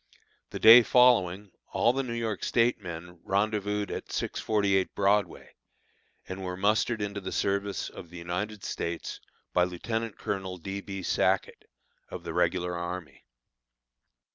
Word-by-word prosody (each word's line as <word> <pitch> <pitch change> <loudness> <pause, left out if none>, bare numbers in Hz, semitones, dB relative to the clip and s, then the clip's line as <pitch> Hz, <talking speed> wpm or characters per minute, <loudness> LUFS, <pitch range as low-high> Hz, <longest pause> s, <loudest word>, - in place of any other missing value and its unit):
The - - -6
day 115 +2 +10
following 105 -6 +3 0.2
all 120 - +3
the 135 - 0
New 120 -3 -4
York 115 -4 -3
State 115 -2 +2
men 90 -1 -8
rendezvoused 105 0 0
at - - -6
648 100 -3 0
Broadway, 100 -2 0 0.7
and 95 +1 -6
were 90 -1 -4
mustered 105 +3 +1
into 100 0 -4
the 95 - -5
service 100 0 -1
of 85 - -10
the 90 - -10
United 90 +5 -4
States 85 0 -4 0.3
by 90 - +4
Lieutenant 110 +5 -3
colonel 95 -2 -4
D. 95 +3 -5
B. 95 -2 -6
Sackett, - - 0 0.4
of - - -7
the - - -5
regular 90 -1 0
army. 85 -1 -6
100 Hz, 140 wpm, -28 LUFS, 90-110 Hz, 0.7 s, day